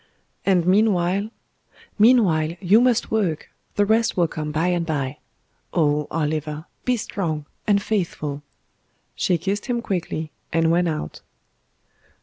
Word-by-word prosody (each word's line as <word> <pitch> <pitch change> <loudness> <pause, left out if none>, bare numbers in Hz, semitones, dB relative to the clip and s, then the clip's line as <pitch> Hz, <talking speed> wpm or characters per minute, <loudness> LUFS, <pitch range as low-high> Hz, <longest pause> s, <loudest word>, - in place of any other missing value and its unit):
"And 180 -3 +3
meanwhile 195 0 +2 0.3
" - - -28
"Meanwhile, 170 -10 +4
you 205 +4 +5
must 245 -2 +2
work; 190 -8 -1 0.2
the 205 - +3
rest 225 +1 +2
will 175 -2 +3
come 155 -1 -4
by 160 +4 +1
and 175 -1 +1
bye. 145 -4 -3 0.6
Oh! 150 -3 +2
Oliver, 155 0 -2 0.2
be 250 -1 +2
strong 160 -8 -3 0.2
and 205 -1 +4
faithful." 170 -9 -2 0.7
She 180 - +1
kissed 195 - -3
him 245 -2 0
quickly, 170 -7 -3 0.2
and 165 0 +2
went 175 +1 +2
out. 155 - -5
175 Hz, 135 wpm, -23 LUFS, 155-205 Hz, 0.7 s, you